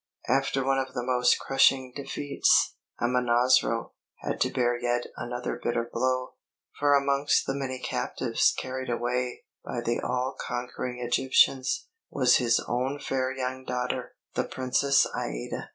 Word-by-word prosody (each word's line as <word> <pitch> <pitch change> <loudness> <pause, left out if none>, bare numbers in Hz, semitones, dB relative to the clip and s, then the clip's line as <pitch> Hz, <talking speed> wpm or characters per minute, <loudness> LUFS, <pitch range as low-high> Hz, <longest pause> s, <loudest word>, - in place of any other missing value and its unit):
After 135 -1 +1
one 135 0 +2
of 135 - -1
his - - -19
most 125 0 +2
crushing 135 -1 +3
defeats, 145 0 +2 0.3
Amonasro 120 -1 +2 0.3
had - - -3
to - - +3
bear 120 -1 +1
yet 120 0 -1
another 120 +1 -4
bitter 120 0 0
blow, 130 +1 0 0.5
for 145 0 +4
amongst 140 +1 +2
the 135 - -1
many 135 -2 -3
captives 125 - 0
carried 130 0 -4
away 125 +1 -2 0.2
by 120 - -4
the 120 0 -1
all 125 +1 -2
conquering 125 0 -4
Egyptians, 130 - +2 0.2
was 125 -3 +4
his 120 -2 +2
own 130 +4 -1
fair 130 -2 -1
young 130 0 -4
daughter, 125 -1 -3 0.2
the - - 0
Princess 140 +2 +2
Aïda. - - -4
125 Hz, 135 wpm, -27 LUFS, 120-135 Hz, 0.5 s, for